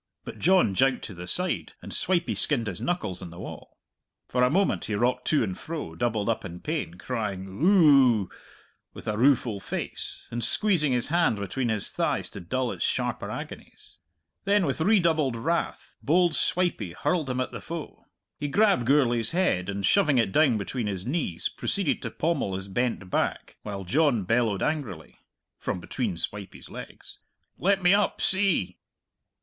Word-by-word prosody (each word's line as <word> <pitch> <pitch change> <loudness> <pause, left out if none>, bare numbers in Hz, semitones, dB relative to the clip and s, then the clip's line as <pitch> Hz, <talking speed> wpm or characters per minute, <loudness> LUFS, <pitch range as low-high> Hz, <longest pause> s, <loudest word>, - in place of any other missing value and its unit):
But - - -8
John 180 - +4
jouked 130 +6 +2
to 100 - -6
the 90 0 -9
side, 180 - -1
and - - -9
Swipey 175 -2 +1
skinned 130 -6 +2
his 95 -5 -3
knuckles 175 - -2
on - - -7
the 85 - -12
wall. - - -9 0.5
For 125 - 0
a 125 - +4
moment 190 +7 +1
he 105 - -2
rocked 125 +4 0
to 155 - +3
and 95 -4 -3
fro, 155 - -6
doubled 105 +3 -1
up 115 - 0
in 90 -2 -7
pain, 150 - -3
crying 100 -3 -4
"Ooh!" 135 - +4 0.7
with - - -10
a 105 - 0
rueful 120 -3 +2
face, - - -5
and 120 0 -3
squeezing 180 -10 +2
his 125 +1 +2
hand 170 -7 +2
between 105 +5 -2
his 110 -3 0
thighs - - -1
to - - -8
dull 125 +8 -2
its - - -4
sharper - - -1
agonies. - - -9 0.4
Then 200 -1 +3
with 140 +1 -2
redoubled 160 - +3
wrath 165 +9 -2
bold 170 +3 +3
Swipey 170 - +1
hurled 155 - -1
him 125 0 -2
at 130 - -2
the - - -7
foe. 165 -2 -8 0.3
He 145 - -2
grabbed 195 - +3
Gourlay's 120 -4 +4
head, 135 - +1
and 100 0 -2
shoving 155 - +3
it 115 -5 +2
down 135 -2 +4
between 110 +3 -3
his 95 -2 -3
knees, 130 - -1
proceeded 195 -6 -1
to - - -4
pommel 150 - -1
his 95 +1 -5
bent 100 -3 -2
back, - - -2
while 100 -2 -6
John 130 - +2
bellowed 115 0 +1
angrily 120 - -4 0.4
(from - - -3
between 100 0 -3
Swipey's 100 +2 -6
legs), - - -10 0.4
"Let 195 0 +2
me 180 +2 +6
up, 205 0 +1
see!" 185 - +1
125 Hz, 170 wpm, -26 LUFS, 100-165 Hz, 0.7 s, me